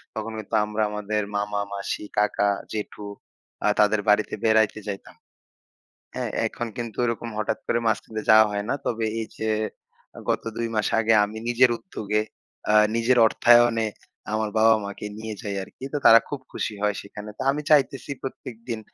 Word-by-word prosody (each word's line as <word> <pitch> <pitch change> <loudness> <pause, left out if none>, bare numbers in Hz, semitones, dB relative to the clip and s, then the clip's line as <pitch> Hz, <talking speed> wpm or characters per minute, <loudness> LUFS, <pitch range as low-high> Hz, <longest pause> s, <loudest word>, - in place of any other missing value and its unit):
তখন 110 +1 -4
কিন্তু 110 +1 -4
আমরা 105 +1 -1
আমাদের 105 0 -2
মামা, 105 0 -1
মাসি, 100 +1 -4
কাকা, 105 0 +2 0.2
জেঠু 105 -1 -5 0.6
আ - - +4
তাদের 105 0 +4
বাড়িতে 105 +1 +3
বেড়াইতে 110 -1 +3
যাইতাম। 100 -1 -7 1.0
হ্যাঁ? - - -2 0.2
এখন 120 - -5
কিন্তু 115 -3 -5
ওইরকম 115 0 -2
হঠাৎ 110 - -1
করে 120 - +1
মাঝখান 110 - -1
দিয়ে 110 - -4
যাওয়া 110 0 +8
হয় 100 0 -2
না। - - +1
তবে 115 -1 -1
এই 110 - -4
যে 110 - -2 0.7
আ - - -7
গত - - 0
২ 115 0 -1
মাস 105 - +1
আগে 115 0 +3
আমি 105 +2 -8
নিজের 125 +1 +5
উদ্যোগে 105 - -2 0.5
আ - - +3 0.2
নিজের 115 +2 +3
অর্থায়নে 120 -1 +4 0.5
আমার 110 0 0
বাবা-মা 110 -2 +4
কে 105 - -5
নিয়ে 110 0 -5
যাই 100 -3 -4
আর - - -12
কি। - - -12
তো - - +1
তারা 115 - +9
খুব 145 - -4
খুশি - - -3
হয় 105 -1 +1
সেখানে। 105 +1 -9
তা - - -2
আমি 150 +2 -3
চাইতেছি 140 -1 +3
প্রত্যেকদিন 115 -3 -6
110 Hz, 175 wpm, -24 LUFS, 105-115 Hz, 1.0 s, তারা